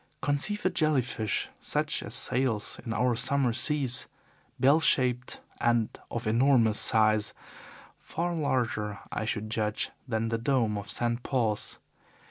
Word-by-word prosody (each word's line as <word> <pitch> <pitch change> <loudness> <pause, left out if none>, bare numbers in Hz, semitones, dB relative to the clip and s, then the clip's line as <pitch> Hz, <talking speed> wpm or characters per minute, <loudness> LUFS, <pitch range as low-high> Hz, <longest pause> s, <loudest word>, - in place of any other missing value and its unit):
"Conceive 145 +10 +1
a 185 - +3
jelly 155 -6 +2
fish 110 -3 -2
such - - -1
as - - -5
sails 125 -5 0
in 115 - -5
our 125 +1 +1
summer 130 0 +1
seas, 130 0 +3 0.5
bell 140 +4 +5
shaped 125 -5 +1 0.2
and 120 -2 +2 0.2
of 120 0 -5
enormous 115 -1 +3
size 110 -1 +2 0.6
far 175 +1 -3
larger, 120 -8 -1
I 110 - -3
should 110 -1 -3
judge, 110 -1 -1 0.2
than 115 -1 -1
the 115 0 -1
dome 120 -4 +1
of 100 -1 -6
St. 120 0 +2
Paul's. 115 -6 -1
120 Hz, 135 wpm, -28 LUFS, 110-135 Hz, 0.6 s, bell